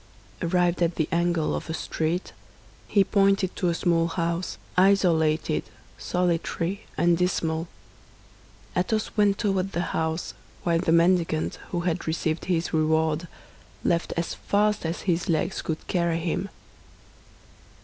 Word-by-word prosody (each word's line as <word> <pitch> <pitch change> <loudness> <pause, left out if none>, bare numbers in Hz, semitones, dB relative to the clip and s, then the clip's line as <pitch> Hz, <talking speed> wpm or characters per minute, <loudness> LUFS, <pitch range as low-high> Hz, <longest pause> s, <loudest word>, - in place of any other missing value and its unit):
Arrived 175 0 +1
at 170 0 +2
the 155 - 0
angle 170 -2 +1
of - - -5
a 160 - -1
street, 165 +2 -2 0.5
he 200 - +4
pointed 195 -1 +2
to 180 - 0
a - - +1
small 165 0 +2
house, 170 +1 -2 0.2
isolated, 165 -5 +3 0.4
solitary, 180 +2 -1
and 170 0 +3
dismal. 165 -2 0 1.1
Athos 215 +4 0
went 205 -2 +3
toward 195 -2 0
the 175 - -2
house, 160 +1 -1 0.3
while 170 -1 +2
the 165 - +1
mendicant, 170 -1 +2
who 175 - -1
had 175 -1 -2
received 160 0 -1
his 175 -2 -1
reward, 160 +1 +1 0.6
left 170 0 +1
as 170 - -1
fast 210 -3 +1
as 165 - -3
his 180 0 0
legs 160 -2 0
could 160 -1 -4
carry 170 -2 0
him. 170 +4 -2
170 Hz, 130 wpm, -26 LUFS, 165-185 Hz, 1.1 s, he